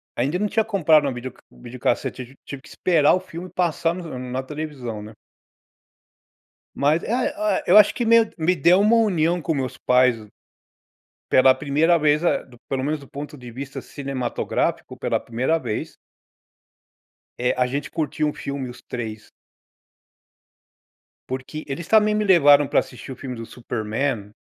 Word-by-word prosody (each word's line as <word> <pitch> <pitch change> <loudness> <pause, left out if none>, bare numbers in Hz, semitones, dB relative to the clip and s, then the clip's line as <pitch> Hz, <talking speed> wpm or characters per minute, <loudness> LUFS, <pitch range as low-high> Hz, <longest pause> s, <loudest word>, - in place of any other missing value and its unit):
ainda 140 +8 0
não 210 - +1
tinha 220 +2 +1
comprado 160 -8 +3
uma 135 - -1
videoc 125 +1 -7
videocassete, 125 +1 -3
tiv 130 +3 -18
tive 140 -1 -8
que 160 - -16
esperar 160 -5 +3
o - - -1
filme 185 -1 -9
passar 170 -2 0
no 165 -8 -7
na 130 +1 -4
televisão, 135 -6 -6
né. 105 +1 -10 1.6
Mas, 150 +4 +2
ae 245 +5 0
ae 315 0 0
eu 185 - +7
acho 210 - +7
que 240 - -1
meio 230 -1 +5
me 165 +2 +2
deu 175 +5 +4
uma 220 +3 +4
união 175 -6 +2
com 160 - -1
meus 130 -3 -3
pais 125 -4 +2 1.0
pela 130 0 +6
primeira 150 +5 +2
vez, 150 0 +2
ah, 175 - 0 0.2
pelo 135 -1 -1
menos 150 +2 -1
do 140 - -14
ponto 145 +1 -8
de 125 -2 -10
vista 135 +3 -7
cinematográfico, 135 -4 -3
pela - - -1
primeira 125 +8 -1
vez 115 -6 -5 1.4
eh, 125 0 +1
a 125 - +3
gente 140 +3 -4
curtiu 155 -1 -1
um 150 - -2
filme, 140 -2 -5
os 120 - -11
3. 110 -3 -7 2.0
Porque 130 +4 -5
eles 155 +4 -5
também 215 0 +4
me 210 0 +1
levaram 145 -7 +6
para - - +3
assistir 130 +2 -7
o - - -6
filme 130 -2 -7
do 115 -1 -7
Super-men 110 -1 -3
145 Hz, 160 wpm, -22 LUFS, 125-170 Hz, 2.0 s, eu